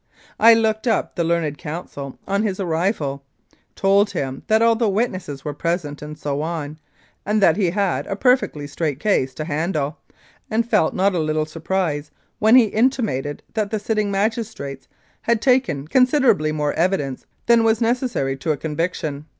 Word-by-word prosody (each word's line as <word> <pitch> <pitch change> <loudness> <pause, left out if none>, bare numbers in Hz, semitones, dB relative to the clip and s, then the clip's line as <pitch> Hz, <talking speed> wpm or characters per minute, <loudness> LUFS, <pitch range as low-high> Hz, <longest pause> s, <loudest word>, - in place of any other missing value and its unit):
I 230 +1 +8
looked 220 +1 0
up 225 - +1
the 170 - -1
learned 165 -3 -1
counsel 150 -4 -7
on 200 +1 +1
his 205 -3 -2
arrival, 160 -5 -1 0.5
told 200 +2 +3
him 135 -8 -4
that 220 0 +3
all 230 0 +5
the 225 -1 +1
witnesses 185 - -2
were 150 - -3
present 155 -1 -3
and 150 0 -8
so 145 -1 -3
on, 155 -2 -4 0.4
and 210 +2 +1
that 170 -6 +5
he 190 -3 +1
had 180 -7 -1
a 195 - -2
perfectly 250 - +1
straight 145 -1 -3
case 135 -11 +1
to 155 - -4
handle, 155 -1 -2 0.5
and 225 +1 0
felt 210 -9 +2
not 195 +1 +2
a 175 - 0
little 155 0 0
surprise 160 -2 -2 0.3
when 220 +3 +5
he 250 -3 +7
intimated 215 - 0
that 215 -2 -1
the 220 - -1
sitting 215 0 -1
magistrates 200 - -3 0.3
had 235 -1 +1
taken 250 - +1
considerably 255 - +3
more 150 -1 -1
evidence 160 -6 -1 0.2
than 235 -1 +5
was 220 -1 +3
necessary 235 - 0
to 135 +4 -1
a 150 - -1
conviction. 155 -1 -3
175 Hz, 165 wpm, -21 LUFS, 150-220 Hz, 0.5 s, I